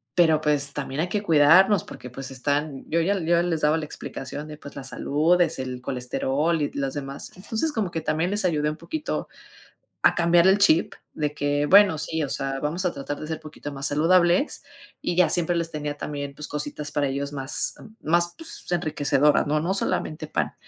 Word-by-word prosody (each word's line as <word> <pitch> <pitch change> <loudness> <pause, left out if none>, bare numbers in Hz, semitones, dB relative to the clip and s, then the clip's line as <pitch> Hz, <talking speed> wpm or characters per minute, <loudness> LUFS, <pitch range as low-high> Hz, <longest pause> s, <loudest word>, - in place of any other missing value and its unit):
pero, 160 -3 +4
pues, 145 -2 +2
también 140 0 -3
hay 175 - -2
que 210 -1 -2
cuidarnos 165 +4 +5
porque, 125 - -10
pues, 135 +2 -7
están", 140 +2 -2
yo 165 +1 +2
ya 195 +4 +1
yo 170 0 +2
les 170 -2 -1
daba 150 +2 +3
la 155 - -4
explicación 145 +1 -7
de, 150 -1 -9
pues, 145 - -12
la 140 - -6
salud, 155 +7 +1
es 165 -5 +1
el 130 -1 -5
colesterol 135 +6 -1
y 145 - -1
los 135 -1 -3
demás. 140 -1 -6
Entonces, 225 +11 -2
como 200 -8 -2
que 165 - -2
también 160 +2 -1
les 205 -2 +2
ayudé 150 -3 +1
un 150 - -5
poquito 315 -2 -4 0.8
a - - +5
cambiar 170 0 +4
el 190 +1 +5
chip 170 -5 +3 0.2
de 150 -1 -2
que, 145 0 0
bueno, 195 0 +6
sí, 160 +1 -2
o 140 - -3
sea, 135 0 -2
vamos 170 +6 -2
a 175 - 0
tratar 145 +1 -5
de - - -6
ser 160 -1 -4
poquito 150 -1 -8
más 140 0 -1
saludables, 175 - +2 0.4
y 175 - -2
ya 180 - +5
siempre 175 0 +2
les 165 -1 -2
tenía 150 -1 -4
también, 140 -1 -5
pues, 150 +1 -2
cositas 150 0 -2
para 145 -1 0
ellos 140 +1 -3
más 135 -1 +1 0.3
más, 170 +2 +2
pues, 325 0 -6
enriquecedoras, 150 -4 +2
¿no? 150 +1 +1
No 170 +5 -1
solamente 155 -5 -2
pan. - - -2
155 Hz, 205 wpm, -24 LUFS, 145-175 Hz, 0.8 s, bueno